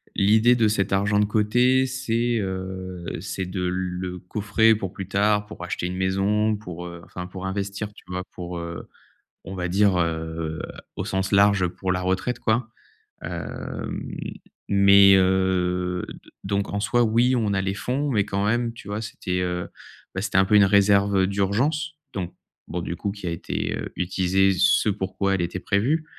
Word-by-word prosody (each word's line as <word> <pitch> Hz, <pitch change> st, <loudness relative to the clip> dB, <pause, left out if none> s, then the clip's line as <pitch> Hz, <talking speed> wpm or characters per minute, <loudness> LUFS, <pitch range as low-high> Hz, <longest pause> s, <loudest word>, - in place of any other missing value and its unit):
l'idée 110 Hz, +5 st, +5 dB
de 115 Hz, -2 st, +3 dB
cet 100 Hz, -2 st, 0 dB
argent 105 Hz, +1 st, +2 dB
de 105 Hz, -, +4 dB
côté, 120 Hz, +5 st, +3 dB
c'est, 120 Hz, -2 st, 0 dB
heu, 95 Hz, -2 st, -5 dB, 0.2 s
c'est 95 Hz, 0 st, -4 dB
de 90 Hz, +1 st, -4 dB
le 90 Hz, 0 st, -2 dB
coffrer 105 Hz, +4 st, +2 dB
pour 95 Hz, -3 st, -4 dB
plus 95 Hz, -, -6 dB
tard, 105 Hz, +1 st, +2 dB
pour 105 Hz, -4 st, -9 dB
acheter 90 Hz, 0 st, -3 dB
une 90 Hz, +1 st, -3 dB
maison, 100 Hz, +3 st, +1 dB
pour, 90 Hz, -5 st, -8 dB
heu, 85 Hz, -1 st, -9 dB
enfin, 90 Hz, 0 st, -7 dB
pour 95 Hz, +1 st, -7 dB
investir, 100 Hz, +2 st, -3 dB
tu -, -, -16 dB
vois, 90 Hz, 0 st, -4 dB
pour, 90 Hz, 0 st, -6 dB
heu, 85 Hz, -1 st, -6 dB, 0.6 s
on 95 Hz, -, -7 dB
va 90 Hz, -1 st, -2 dB
dire, 95 Hz, 0 st, +3 dB
heu, 80 Hz, -1 st, -2 dB, 0.4 s
au -, -, -3 dB
sens 95 Hz, +1 st, -2 dB
large, 100 Hz, -2 st, +5 dB
pour 95 Hz, +1 st, -2 dB
la 90 Hz, -, -1 dB
retraite, 95 Hz, +7 st, -1 dB
quoi, 110 Hz, 0 st, 0 dB, 0.5 s
hem, -, -, -5 dB, 0.7 s
mais, 100 Hz, 0 st, +7 dB
heu, 90 Hz, -1 st, +1 dB
d -, -, -12 dB
donc, 100 Hz, +1 st, -1 dB
en 100 Hz, -, 0 dB
soi, 120 Hz, +3 st, +2 dB
oui, 120 Hz, +3 st, +3 dB
on 105 Hz, -3 st, 0 dB
a 95 Hz, -, +1 dB
les 95 Hz, 0 st, -1 dB
fonds 135 Hz, +7 st, -2 dB
mais 105 Hz, -5 st, +2 dB
quand 100 Hz, -1 st, -1 dB
même, 120 Hz, +2 st, +1 dB
tu 110 Hz, -3 st, -11 dB
vois, 105 Hz, +1 st, -3 dB
c'était, 95 Hz, -4 st, -3 dB
heu, 90 Hz, -1 st, -2 dB, 0.4 s
bah, 95 Hz, -, -3 dB
c'était 95 Hz, -2 st, 0 dB
un 95 Hz, -, +5 dB
peu 105 Hz, -, +3 dB
une 100 Hz, -1 st, +7 dB
réserve, 100 Hz, 0 st, +4 dB
heu, 95 Hz, -, +3 dB
d'urgence 125 Hz, +11 st, 0 dB, 0.2 s
donc 90 Hz, -6 st, -4 dB, 0.3 s
bon, 90 Hz, -, -3 dB
du 85 Hz, -, -4 dB
coup, 100 Hz, +2 st, -2 dB
qui 100 Hz, -1 st, -9 dB
a -, -, 0 dB
été, 85 Hz, -, -3 dB
heu, -, -, -6 dB
utilisée 95 Hz, +2 st, +2 dB
ce 95 Hz, +3 st, +4 dB
pourquoi 100 Hz, 0 st, -1 dB
elle 95 Hz, -, -1 dB
était 85 Hz, +1 st, -3 dB
prévue, 125 Hz, -, +1 dB
100 Hz, 185 wpm, -24 LUFS, 90-105 Hz, 0.7 s, mais